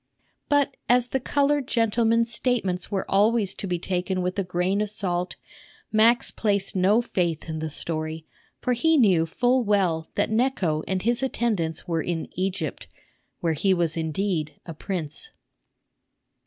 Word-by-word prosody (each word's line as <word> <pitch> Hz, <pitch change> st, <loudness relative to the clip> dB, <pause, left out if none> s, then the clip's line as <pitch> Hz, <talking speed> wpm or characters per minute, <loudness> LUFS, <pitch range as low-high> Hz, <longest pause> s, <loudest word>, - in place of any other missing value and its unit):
But 285 Hz, -1 st, +2 dB
as 245 Hz, 0 st, +4 dB
the 265 Hz, -, 0 dB
colored 285 Hz, +1 st, +1 dB
gentleman's 230 Hz, 0 st, +2 dB
statements 220 Hz, -8 st, 0 dB
were 195 Hz, -2 st, -2 dB
always 205 Hz, 0 st, +3 dB
to 195 Hz, -, -5 dB
be 180 Hz, -1 st, 0 dB
taken 180 Hz, +1 st, -2 dB
with 180 Hz, +2 st, -2 dB
a -, -, +1 dB
grain 180 Hz, +3 st, 0 dB
of 210 Hz, -, -1 dB
salt, 180 Hz, -3 st, -2 dB, 0.6 s
Max 230 Hz, +2 st, +4 dB
placed 200 Hz, -3 st, 0 dB
no 200 Hz, +6 st, +3 dB
faith 170 Hz, -9 st, -1 dB
in 160 Hz, -1 st, -4 dB
the 160 Hz, 0 st, -3 dB
story; 155 Hz, +1 st, -3 dB, 0.4 s
for 250 Hz, -, +1 dB
he 320 Hz, +7 st, +3 dB
knew 185 Hz, -, +4 dB
full 245 Hz, +8 st, +2 dB
well 185 Hz, -7 st, +1 dB
that -, -, 0 dB
Necho 220 Hz, -10 st, +1 dB
and 185 Hz, -1 st, -1 dB
his 235 Hz, +3 st, +1 dB
attendants 215 Hz, -11 st, -1 dB
were 165 Hz, -2 st, 0 dB
in 165 Hz, -1 st, -3 dB
Egypt, 185 Hz, -4 st, -3 dB, 0.5 s
where 165 Hz, -1 st, +1 dB
he 190 Hz, +5 st, +2 dB
was 170 Hz, -2 st, 0 dB
indeed 160 Hz, -1 st, -2 dB
a 165 Hz, -, -7 dB
prince. 170 Hz, -, -4 dB
195 Hz, 155 wpm, -25 LUFS, 170-230 Hz, 0.6 s, as